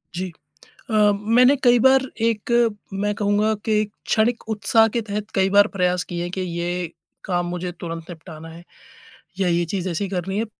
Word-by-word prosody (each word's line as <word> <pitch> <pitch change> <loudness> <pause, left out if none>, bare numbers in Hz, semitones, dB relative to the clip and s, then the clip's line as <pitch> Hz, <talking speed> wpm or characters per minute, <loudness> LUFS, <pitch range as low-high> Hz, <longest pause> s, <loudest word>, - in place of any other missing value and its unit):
जी। 185 0 -4 0.6
अ, 220 - -4 0.4
मैंने 250 +3 +6
कई 245 -1 +5
बार 265 +2 +5 0.2
एक, 225 0 0 0.4
मैं 205 +1 -1
कहूँगा 205 +1 +1
कि 220 - 0
एक 210 - -4
क्षणिक 230 +2 +1
उत्साह 220 +1 +3
के 235 - +1
तहत 210 0 -5
कई 190 0 +3
बार 205 +1 +5
प्रयास 180 -1 +1
किए 175 0 -3
कि - - -1
ये 175 -1 -3 0.3
काम 175 -2 -1
मुझे 180 0 -4
तुरंत 165 -1 -6
निपटाना 165 -1 -10
है 165 +1 -12 0.8
या 190 - +2
ये 170 0 +1
चीज़ 185 +2 -3
ऐसी 180 +4 -2
करनी 190 +1 -3
है। 225 - 0
190 Hz, 175 wpm, -22 LUFS, 175-215 Hz, 0.8 s, मैंने